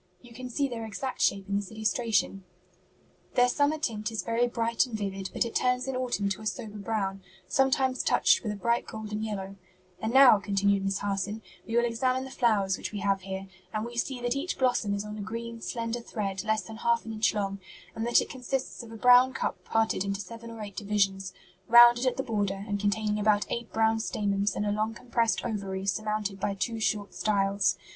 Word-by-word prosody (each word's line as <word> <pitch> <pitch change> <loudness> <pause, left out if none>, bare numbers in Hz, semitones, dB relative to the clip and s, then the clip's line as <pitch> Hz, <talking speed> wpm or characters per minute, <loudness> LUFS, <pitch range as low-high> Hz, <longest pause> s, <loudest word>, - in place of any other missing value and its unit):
You 240 +4 -16
can 255 +1 -7
see 280 +3 0
their 235 -3 -5
exact 225 +4 -4
shape 195 0 +2
in 200 - -1
this 200 -2 -4
illustration. 220 -3 0 0.9
Their 245 -1 +5
summer 285 +4 +2
tint 225 -7 -2
is 215 -5 -3
very 230 +4 +1
bright 230 +1 +1
and 230 -3 -4
vivid, 195 -2 -4
but - - 0
it 230 - -5
turns 250 +1 +1
in 265 - -2
autumn 245 -5 -1
to 200 +2 -3
a 215 - -3
sober 210 0 -5
brown, 195 -2 -2 0.3
sometimes 265 -1 +2
touched - - +4
with 215 - -3
a - - -4
bright 235 +4 0
golden 215 -1 -5
yellow, 200 -3 -4 0.4
And 220 - -1
now," 260 -4 +8
continued 200 0 +1
Miss 195 0 0
Harson, 205 +2 -3 0.2
"we 230 +1 0
will 240 - +4
examine 255 +2 0
the 265 - -8
flowers 210 -7 +1
which - - -5
we 205 -1 -5
have 195 0 +1
here, 190 +1 -6 0.3
and 215 +1 -1
we 240 0 -8
see 250 +2 -2
that 245 +1 0
each 300 +6 -2
blossom 245 -6 +1
is 200 +1 -4
on 210 0 -7
a - - -4
green, 230 +2 -6
slender 230 0 -3
thread 195 -4 -3
less 220 -2 0
than 220 +4 -9
half 235 0 +1
an 225 - -5
inch 215 0 +1
long, 195 -1 -2 0.4
and 225 - -3
that 240 - +5
it - - -4
consists 260 0 -4
of 230 -1 -11
a 225 - -8
brown 250 +3 +6
cup - - -3
parted 225 -4 +1
into 200 0 -2
seven 230 +4 -8
or 225 -1 -8
eight 200 -2 -8
divisions, 195 -2 0 0.4
rounded 240 +2 +8
at 255 - 0
the 265 - -1
border 200 -4 -2
and 205 -1 -1
containing 210 +1 0
about 210 0 +3
eight 235 -1 -3
brown 225 0 +2
stamens 205 -2 -1
and 210 - -1
a 205 - +1
long 215 +2 -1
compressed 235 -2 0
ovary 195 -3 -3
surmounted 210 0 -1
by 200 - -1
two 225 +3 -2
short 210 -2 -1
styles. 195 -2 +1
220 Hz, 215 wpm, -28 LUFS, 200-235 Hz, 0.9 s, now